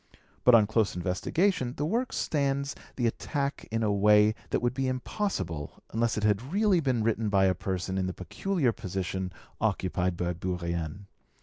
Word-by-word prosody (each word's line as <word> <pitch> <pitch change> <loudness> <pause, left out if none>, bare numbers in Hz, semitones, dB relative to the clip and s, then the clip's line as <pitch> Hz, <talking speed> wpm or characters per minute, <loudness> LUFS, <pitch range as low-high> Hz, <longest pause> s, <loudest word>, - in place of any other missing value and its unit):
But 125 - +8
on 110 -2 +6
close 110 -2 +1
investigation 125 - 0
the 145 - 0
work 235 +9 0
stands 140 -1 0 0.2
the 120 - 0
attack 140 +4 -2
in 115 +1 -1
a 105 - +2
way 105 +1 +5 0.2
that - - +1
would 120 0 0
be 135 0 -1
impossible 130 - -3
unless 115 0 0
it 105 - -1
had 105 -1 +3
really 200 -2 +3
been 130 -7 +1
written 115 -1 +1
by 100 -1 +4
a 95 - +4
person 95 +1 -2
in 95 - 0
the - - -1
peculiar 140 - 0
position 95 -2 -3 0.3
occupied 90 -1 0
by 90 0 -1
Bourrienne. 85 0 -3
110 Hz, 170 wpm, -29 LUFS, 95-135 Hz, 0.3 s, But